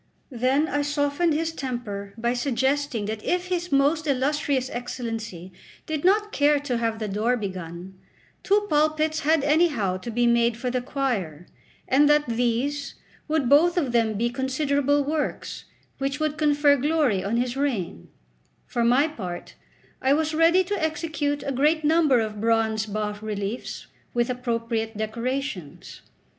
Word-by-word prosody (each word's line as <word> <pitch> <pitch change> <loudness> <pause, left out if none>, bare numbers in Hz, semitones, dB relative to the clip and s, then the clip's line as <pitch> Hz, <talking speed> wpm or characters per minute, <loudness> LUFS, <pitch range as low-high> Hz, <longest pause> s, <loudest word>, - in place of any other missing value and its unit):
Then 260 +5 +1
I 290 - 0
softened 290 +3 +1
his 325 +1 -1
temper 230 -9 -5
by 235 +2 0
suggesting 265 -1 0
that 215 0 -4
if 360 0 -1
his 355 -2 -2
most 290 +3 +2
illustrious 275 -1 0
Excellency 225 -7 -5 0.3
did 310 -2 -3
not 415 +3 +3
care 290 -2 +3
to 255 -5 -2
have 225 -1 -1
the 220 -1 -3
door 215 +5 0
begun, 185 -2 -7 0.4
two 410 +1 +2
pulpits 310 -1 +1
had 310 0 +2
anyhow 290 - +2
to 185 +6 -7
be 240 +1 +1
made 235 -1 +3
for 250 +1 -2
the 250 0 -1
choir, 210 - -2 0.4
and 285 +3 +4
that 295 0 +4
these 245 +5 -1 0.3
would 310 -4 +1
both 330 +7 +5
of 285 -8 +1
them 225 -2 +2
be 235 +3 0
considerable 280 +2 +1
works, 300 +1 -3 0.3
which 275 +2 -2
would 310 -1 0
confer 290 -1 +3
glory 285 -8 +1
on 215 +4 -1
his 245 +1 -1
reign; 230 - -2 0.6
for 240 - -1
my 250 +6 +4
part, 185 - -7 0.5
I 265 +1 +3
was 315 +1 0
ready 335 +4 +4
to 370 -2 -3
execute 305 -2 -1
a 275 - -1
great 300 +4 +2
number 305 -4 +4
of 215 -2 -3
bronze 220 -1 +1
bas 210 0 -3
reliefs 210 +1 -4 0.3
with 240 +1 +1
appropriate 230 -3 -2
decorations. 225 - -4
265 Hz, 150 wpm, -25 LUFS, 225-295 Hz, 0.6 s, both